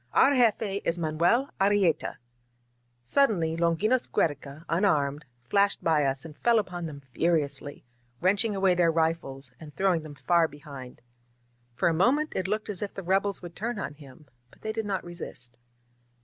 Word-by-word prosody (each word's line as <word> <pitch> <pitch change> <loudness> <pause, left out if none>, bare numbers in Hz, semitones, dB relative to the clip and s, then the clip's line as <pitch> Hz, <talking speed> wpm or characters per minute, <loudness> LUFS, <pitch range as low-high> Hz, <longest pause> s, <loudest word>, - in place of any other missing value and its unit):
Our 270 - +6
jefe 220 -5 +2
is 170 - 0
Manuel 170 - +1
Arrieta 195 -5 +2 0.5
!" 120 0 -44
Suddenly 185 -13 +3
Longinos 170 +9 +1
Giiereca, 145 0 -2
unarmed, 150 -6 +1 0.2
flashed 200 +11 +1
by 155 -3 +3
us 135 +2 -1
and 155 -2 -10
fell 235 -1 +4
upon 180 -5 -2
them 140 -2 -9
furiously, 145 -4 -1 0.3
wrenching 200 +3 +2
away 190 -1 +3
their 175 -2 +3
rifles 160 -5 -1
and 150 -3 -12
throwing 190 -4 +2
them 155 -2 -10
far 170 +2 +3
behind. 140 -4 -11 0.7
For - - +1
a 170 - +3
moment 270 - +2
it 190 - -1
looked 215 +2 -2
as 200 -4 -3
if 205 - -4
the 195 - -6
rebels 195 +2 0
would 175 -1 -9
turn 235 +2 -3
on 150 -7 -4
him, 145 0 -15 0.2
but - - -23
they 220 - -2
did 220 -1 -3
not 195 -2 -2
resist. 125 -8 -8
170 Hz, 165 wpm, -27 LUFS, 145-200 Hz, 0.7 s, Our